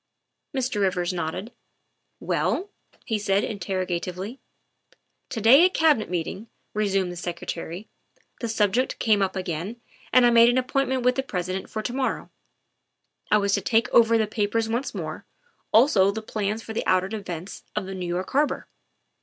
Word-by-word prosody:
' -, -, -55 dB
' 275 Hz, -, -11 dB
Mr. 250 Hz, -5 st, -1 dB
Rivers 180 Hz, -2 st, +1 dB
nodded. 180 Hz, +6 st, -4 dB, 0.4 s
" -, -, -50 dB
Well?" 400 Hz, +3 st, 0 dB, 0.3 s
he 220 Hz, -2 st, -1 dB
said 200 Hz, 0 st, +1 dB
interrogatively. 185 Hz, +2 st, -3 dB, 0.5 s
" -, -, -37 dB
To 230 Hz, -, -4 dB
day 245 Hz, +9 st, +7 dB
at 370 Hz, +1 st, +3 dB
Cabinet 305 Hz, -9 st, +3 dB
meeting," 180 Hz, +5 st, -3 dB, 0.3 s
resumed 195 Hz, -3 st, 0 dB
the -, -, -7 dB
Secre 175 Hz, 0 st, -5 dB
tary, 175 Hz, +4 st, -5 dB, 0.3 s
" -, -, -37 dB
the 235 Hz, -, -2 dB
subject 220 Hz, +3 st, +1 dB
came 215 Hz, -3 st, +2 dB
up 190 Hz, 0 st, 0 dB
again 185 Hz, +5 st, -4 dB, 0.3 s
and 255 Hz, -1 st, +6 dB
I 240 Hz, -, +5 dB
made 235 Hz, 0 st, +7 dB
an 245 Hz, -, +2 dB
ap 255 Hz, -1 st, -1 dB
pointment 265 Hz, -2 st, +1 dB
with 250 Hz, 0 st, +4 dB
the -, -, +2 dB
President 185 Hz, -6 st, -4 dB
for 215 Hz, -, -4 dB
to 240 Hz, -, -3 dB
morrow; 265 Hz, 0 st, -2 dB, 1.0 s
I 210 Hz, -, +5 dB
was 200 Hz, -1 st, +1 dB
to -, -, +2 dB
take 230 Hz, 0 st, +2 dB
over 230 Hz, -1 st, +6 dB
the 220 Hz, -, +2 dB
papers 215 Hz, +1 st, -1 dB
once 235 Hz, +5 st, -2 dB
more, -, -, -6 dB, 0.4 s
also 220 Hz, -5 st, +5 dB
the 215 Hz, +2 st, -3 dB
plans 215 Hz, 0 st, -3 dB
of 220 Hz, -, -5 dB
the -, -, -2 dB
outer 185 Hz, 0 st, +3 dB
defences 190 Hz, -4 st, -6 dB
of 210 Hz, -2 st, -1 dB
New 190 Hz, -2 st, -5 dB
York 175 Hz, +2 st, -3 dB
Harbor. 290 Hz, +2 st, +1 dB
210 Hz, 180 wpm, -25 LUFS, 185-235 Hz, 1.0 s, day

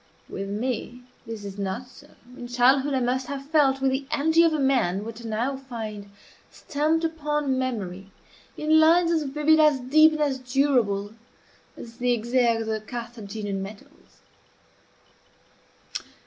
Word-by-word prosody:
With 195 Hz, 0 st, -6 dB
me 245 Hz, +3 st, -4 dB, 0.2 s
this 225 Hz, -3 st, -7 dB
is 200 Hz, 0 st, -8 dB
not 200 Hz, +6 st, -3 dB
so. 285 Hz, +3 st, -17 dB, 0.3 s
In 245 Hz, -, -8 dB
childhood 260 Hz, +3 st, +3 dB
I -, -, +2 dB
must 250 Hz, +1 st, -1 dB
have 275 Hz, -1 st, -5 dB
felt, 280 Hz, -3 st, +2 dB
with 270 Hz, 0 st, +2 dB
the 265 Hz, +1 st, -2 dB
energy 320 Hz, +2 st, +3 dB
of 335 Hz, -1 st, +4 dB
a 310 Hz, -, -1 dB
man, 230 Hz, -8 st, +1 dB
what 230 Hz, +1 st, -8 dB
I 225 Hz, -, -6 dB
now 240 Hz, +5 st, -1 dB
find 220 Hz, -6 st, -7 dB, 0.4 s
stamped 310 Hz, +3 st, -1 dB
upon 295 Hz, -4 st, -1 dB
memory 195 Hz, -7 st, -4 dB, 0.5 s
in 310 Hz, +1 st, +3 dB
lines 335 Hz, +2 st, +5 dB
as 325 Hz, -2 st, +2 dB
vivid, 300 Hz, +3 st, +2 dB
as 300 Hz, -3 st, +5 dB
deep, 310 Hz, +5 st, +5 dB
and 305 Hz, -, -3 dB
as 275 Hz, -3 st, 0 dB
durable 245 Hz, -6 st, +1 dB, 0.6 s
as 230 Hz, -1 st, -11 dB
the 245 Hz, -1 st, +1 dB
exergues 235 Hz, 0 st, +1 dB
of -, -, -4 dB
the 220 Hz, -1 st, -2 dB
Carthaginian 215 Hz, -4 st, -6 dB
medals. 200 Hz, +2 st, -12 dB
255 Hz, 150 wpm, -25 LUFS, 220-290 Hz, 0.6 s, lines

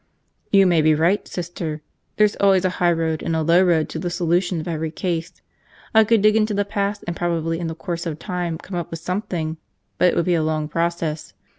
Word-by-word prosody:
"You 195 Hz, -1 st, +6 dB
may 175 Hz, -3 st, +4 dB
be 155 Hz, 0 st, +4 dB
right, 170 Hz, +6 st, +1 dB
Sister. 165 Hz, -3 st, -5 dB, 0.3 s
There's 210 Hz, -1 st, +3 dB
always 190 Hz, -2 st, +3 dB
a 185 Hz, -, +2 dB
high 175 Hz, -1 st, +5 dB
road 165 Hz, -1 st, -1 dB
and 165 Hz, -, -1 dB
a 160 Hz, -, 0 dB
low 170 Hz, +3 st, +5 dB
road 165 Hz, -4 st, +2 dB
to 160 Hz, -, -5 dB
the 175 Hz, +1 st, -2 dB
solution 175 Hz, +1 st, 0 dB
of 155 Hz, -, -6 dB
every 160 Hz, -1 st, -2 dB
case. 170 Hz, 0 st, -3 dB, 0.6 s
I 220 Hz, 0 st, +7 dB
could 225 Hz, -1 st, +3 dB
dig 215 Hz, 0 st, +5 dB
into 215 Hz, -1 st, +2 dB
the 205 Hz, 0 st, +1 dB
past 200 Hz, 0 st, -2 dB
and 170 Hz, -, -3 dB
probably 165 Hz, -1 st, -1 dB
in 170 Hz, -, -3 dB
the 160 Hz, -, -4 dB
course 170 Hz, -1 st, -4 dB
of 155 Hz, -2 st, -4 dB
time 175 Hz, -1 st, -3 dB
come 180 Hz, +2 st, -9 dB
up 175 Hz, -1 st, -3 dB
with 165 Hz, -, -6 dB
something, 170 Hz, -3 st, -3 dB, 0.4 s
but -, -, +5 dB
it -, -, -3 dB
would 170 Hz, -, +1 dB
be 180 Hz, -, +2 dB
a 165 Hz, -, +2 dB
long 155 Hz, -1 st, -1 dB
process. 165 Hz, -1 st, -2 dB
170 Hz, 230 wpm, -22 LUFS, 160-185 Hz, 0.6 s, I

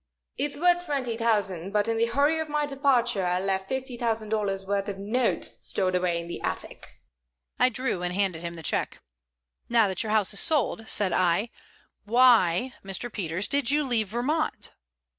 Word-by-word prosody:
"It's 285 Hz, +2 st, -1 dB
worth 350 Hz, +2 st, +3 dB
twenty 265 Hz, -7 st, -2 dB
thousand, 200 Hz, -5 st, -1 dB
but 210 Hz, 0 st, +2 dB
in 230 Hz, -, 0 dB
the 230 Hz, +1 st, +2 dB
hurry 285 Hz, +7 st, +2 dB
of 315 Hz, -1 st, -4 dB
my 300 Hz, 0 st, 0 dB
departure 260 Hz, -7 st, +1 dB
I 180 Hz, 0 st, +1 dB
left 190 Hz, 0 st, -2 dB
fifty 265 Hz, -1 st, -3 dB
thousand 225 Hz, -2 st, -2 dB
dollars' 200 Hz, -3 st, -1 dB
worth 200 Hz, +1 st, -1 dB
of 195 Hz, -, -5 dB
notes 220 Hz, +6 st, -1 dB
stored 185 Hz, -1 st, 0 dB
away 180 Hz, -2 st, +1 dB
in 170 Hz, -, -6 dB
the 170 Hz, -, -6 dB
attic." -, -, -5 dB, 0.6 s
I 255 Hz, -, +5 dB
drew 255 Hz, -6 st, -2 dB
and 180 Hz, 0 st, -2 dB
handed 185 Hz, -3 st, -1 dB
him 170 Hz, 0 st, -5 dB
the 165 Hz, -, -9 dB
check. -, -, -1 dB, 0.7 s
"Now 230 Hz, -3 st, +4 dB
that 190 Hz, -1 st, 0 dB
your 220 Hz, -, -2 dB
house 215 Hz, -2 st, +2 dB
is 200 Hz, -, 0 dB
sold," 265 Hz, -7 st, 0 dB
said 195 Hz, -4 st, +1 dB
I, 185 Hz, +6 st, +1 dB, 0.5 s
"why, 235 Hz, -2 st, +4 dB
Mr. 195 Hz, +5 st, -4 dB
Peters, 180 Hz, 0 st, -2 dB
did 280 Hz, -4 st, +1 dB
you 295 Hz, +1 st, +3 dB
leave 235 Hz, -6 st, 0 dB
Vermont?" 275 Hz, +9 st, -2 dB
220 Hz, 180 wpm, -26 LUFS, 190-255 Hz, 0.7 s, I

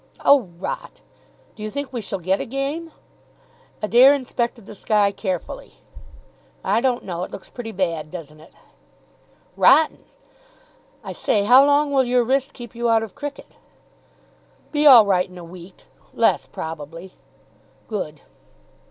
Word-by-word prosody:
"Oh, 270 Hz, -9 st, +5 dB
rot.... -, -, -6 dB, 0.5 s
Do -, -, -13 dB
you 215 Hz, -, -4 dB
think 280 Hz, +2 st, -5 dB
we 240 Hz, -, -3 dB
shall 195 Hz, -, -4 dB
get 185 Hz, +2 st, -1 dB
a -, -, -4 dB
game?" 280 Hz, +6 st, -4 dB, 0.9 s
Adair 250 Hz, +6 st, +6 dB
inspected 240 Hz, -4 st, -3 dB
the -, -, -10 dB
sky 205 Hz, 0 st, +1 dB
carefully. 190 Hz, -3 st, -5 dB, 0.9 s
"I 230 Hz, -, +1 dB
don't 255 Hz, -1 st, 0 dB
know. 175 Hz, -2 st, -5 dB
It -, -, -6 dB
looks 190 Hz, -, -11 dB
pretty 235 Hz, -2 st, -7 dB
bad, 170 Hz, -6 st, -2 dB
doesn't 155 Hz, -3 st, -10 dB
it?" 160 Hz, -, -17 dB, 1.0 s
"Rotten. 315 Hz, -1 st, +4 dB, 1.0 s
I -, -, -6 dB
say, 205 Hz, -, 0 dB
how 250 Hz, +6 st, +7 dB
long 290 Hz, +1 st, +3 dB
will 270 Hz, -2 st, +3 dB
your 245 Hz, 0 st, +2 dB
wrist 265 Hz, +3 st, 0 dB
keep 240 Hz, -2 st, -11 dB
you 235 Hz, 0 st, -1 dB
out 225 Hz, -1 st, +3 dB
of 220 Hz, -, -8 dB
cricket?" 290 Hz, -1 st, -8 dB, 1.1 s
"Be 300 Hz, 0 st, +3 dB
all 240 Hz, -6 st, +9 dB
right 185 Hz, -2 st, +1 dB
in 180 Hz, -, -13 dB
a 175 Hz, -, -9 dB
week. 180 Hz, +2 st, -13 dB, 0.3 s
Less, -, -, +2 dB
probably." 165 Hz, +3 st, -8 dB, 0.7 s
"Good." 155 Hz, -9 st, -5 dB
225 Hz, 145 wpm, -22 LUFS, 185-265 Hz, 1.1 s, all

